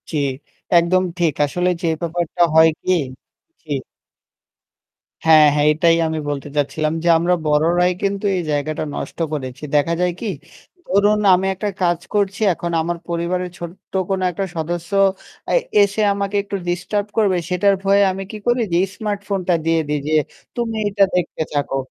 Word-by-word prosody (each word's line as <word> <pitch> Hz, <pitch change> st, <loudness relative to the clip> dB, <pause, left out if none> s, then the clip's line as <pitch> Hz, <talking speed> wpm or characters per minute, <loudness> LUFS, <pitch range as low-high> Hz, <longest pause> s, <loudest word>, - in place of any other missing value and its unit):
জি। 160 Hz, -, -2 dB, 0.6 s
একদম 185 Hz, +2 st, +2 dB, 0.2 s
ঠিক। 165 Hz, -4 st, +2 dB
আসলে 180 Hz, +5 st, -1 dB
যে 170 Hz, -, -1 dB
ব্যাপারটা 170 Hz, +1 st, -2 dB
হয় 160 Hz, 0 st, +7 dB
কি? -, -, -1 dB, 0.7 s
জি। 155 Hz, -, -11 dB, 1.5 s
হ্যাঁ, 155 Hz, -1 st, +7 dB
হ্যাঁ, 150 Hz, 0 st, +3 dB
এটাই 165 Hz, +2 st, +3 dB
আমি 160 Hz, 0 st, -2 dB
বলতে 145 Hz, -1 st, -4 dB
চাচ্ছিলাম। 155 Hz, +2 st, 0 dB
যে 170 Hz, -, +2 dB
আমরা 175 Hz, +2 st, +2 dB
বড়রাই 165 Hz, +4 st, +3 dB
কিন্তু 200 Hz, +1 st, -1 dB
এই 180 Hz, -, 0 dB
জায়গাটা 150 Hz, +1 st, -2 dB
নষ্ট -, -, -6 dB
করেছি। 130 Hz, -2 st, -5 dB
দেখা 150 Hz, +3 st, +2 dB
যায় 180 Hz, 0 st, +2 dB
কি? 225 Hz, -, -3 dB, 0.6 s
ধরুন 205 Hz, +2 st, +3 dB
আমি 185 Hz, +1 st, +2 dB
একটা 205 Hz, +2 st, -2 dB
কাজ 175 Hz, -2 st, +2 dB
করছি 200 Hz, 0 st, 0 dB
এখন 170 Hz, +1 st, -4 dB
আমার 170 Hz, +1 st, -2 dB
পরিবারের 175 Hz, +2 st, -2 dB
ছোট্ট 175 Hz, +3 st, -10 dB, 0.2 s
কোন 195 Hz, -1 st, 0 dB
একটা 195 Hz, +3 st, -3 dB
সদস্য 170 Hz, +1 st, -4 dB, 0.6 s
এ -, -, +4 dB, 0.3 s
এসে 200 Hz, +2 st, 0 dB
আমাকে 200 Hz, 0 st, -3 dB
একটু 200 Hz, -, -5 dB
ডিস্টার্ব 190 Hz, +4 st, -1 dB
করবে 200 Hz, -4 st, +3 dB
সেটার 195 Hz, +2 st, +3 dB
ভয়ে 200 Hz, +1 st, +4 dB
আমি 190 Hz, +1 st, -5 dB
কি 215 Hz, -, -6 dB
করি 240 Hz, 0 st, +2 dB
যে -, -, +1 dB
এই 195 Hz, -, +1 dB
স্মার্টফোনটা 200 Hz, -4 st, -2 dB
দিয়ে 165 Hz, 0 st, +2 dB
দিই 150 Hz, 0 st, -1 dB
যে 155 Hz, -, -1 dB, 0.4 s
"তুমি 235 Hz, -2 st, -2 dB
এটা 200 Hz, 0 st, +3 dB
দেখতে 180 Hz, -2 st, -1 dB
থাকো।" 145 Hz, -2 st, -1 dB
175 Hz, 160 wpm, -20 LUFS, 160-195 Hz, 1.5 s, হয়